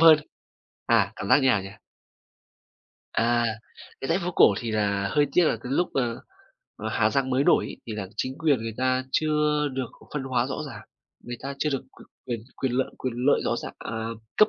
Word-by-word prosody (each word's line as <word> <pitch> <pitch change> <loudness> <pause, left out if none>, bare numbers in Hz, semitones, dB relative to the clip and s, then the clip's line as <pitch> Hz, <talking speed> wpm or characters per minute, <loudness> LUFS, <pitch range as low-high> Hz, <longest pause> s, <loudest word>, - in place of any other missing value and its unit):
hơn. 160 -2 +9 0.7
À, - - +3
cảm 95 - -5
giác - - +8
như 135 - +3
nào 110 -6 +4
nhỉ? 95 - -7 1.4
À, 120 +1 +2 0.6
cái 135 - -4
dãy 165 - +3
phố 180 -1 -2
cổ 110 - +6
thì 115 -2 -3
là 100 -2 +1
hơi 145 -1 +3
tiếc 180 - +5
là - - +2
cái 125 - -4
lúc, 175 +5 +2
ờ, 120 -3 0 0.6
ở - - -4
Hà - - +2
Giang 135 -1 +1
mới 130 +2 +2
nổi - - +5
ấy - - -7
thì 115 - -4
là 100 -3 -4
chính 130 +4 -3
quyền 150 -8 +2
người 115 -1 -4
ta 130 0 +1
chưa 150 -1 +2
được 130 -2 -3 0.2
phân 150 - -1
hóa 125 -2 +1
rõ 135 - -3
ràng, 140 - -8 0.4
người 120 0 -5
ta 140 +1 -4
chưa 150 - +1
được 135 - -1 0.2
quyền - - -14 0.2
quyền 120 -3 -2 0.2
quyền 130 -2 -1
lợi 130 +1 0
quyền 130 -2 -3
lợi 130 +4 +3
rõ - - +1
ràng - - -5
à, - - -6 0.4
cấp 215 - +7
130 Hz, 215 wpm, -26 LUFS, 120-150 Hz, 1.4 s, hơn